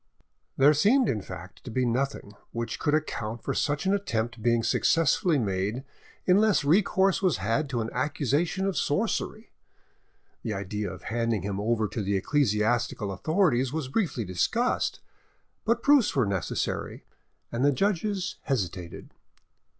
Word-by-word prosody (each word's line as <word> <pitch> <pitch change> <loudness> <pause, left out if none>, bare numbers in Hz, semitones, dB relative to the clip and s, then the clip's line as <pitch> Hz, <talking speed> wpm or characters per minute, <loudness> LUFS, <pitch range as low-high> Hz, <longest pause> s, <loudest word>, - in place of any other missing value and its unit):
There 145 +3 +6
seemed, 225 - +4
in 110 - 0
fact, - - -10
to - - -8
be 130 +2 0
nothing 125 -3 -2 0.2
which 115 -1 -3
could 150 -1 +2
account 115 -7 -3
for - - -2
such 145 +4 -1
an 190 - +3
attempt 115 - -2
being 115 0 +2
successfully 165 +6 +2
made 105 +2 -1 0.4
unless 200 0 +4
recourse 190 +4 +3
was 185 -4 +2
had 115 +6 -1
to 120 -4 -1
an 110 - -4
accusation 150 +7 0
of 195 -2 -1
sorcery. 215 +5 -1 0.9
The 110 - -3
idea 100 +1 -3
of - - -10
handing 115 -3 -1
him 100 0 -3
over 110 +1 +1
to 110 - -3
the 100 0 0
ecclesiastical 110 -3 +1
authorities 135 - +1
was 150 -3 -3
briefly 145 - -1
discussed, 225 - 0 0.6
but 230 +1 +1
proofs 285 -6 +4
were 130 -5 +3
necessary, 95 -3 -3 0.5
and 120 +2 -1
the 145 - +5
judges 195 +3 -1
hesitated. 95 - -3
130 Hz, 140 wpm, -27 LUFS, 110-180 Hz, 0.9 s, There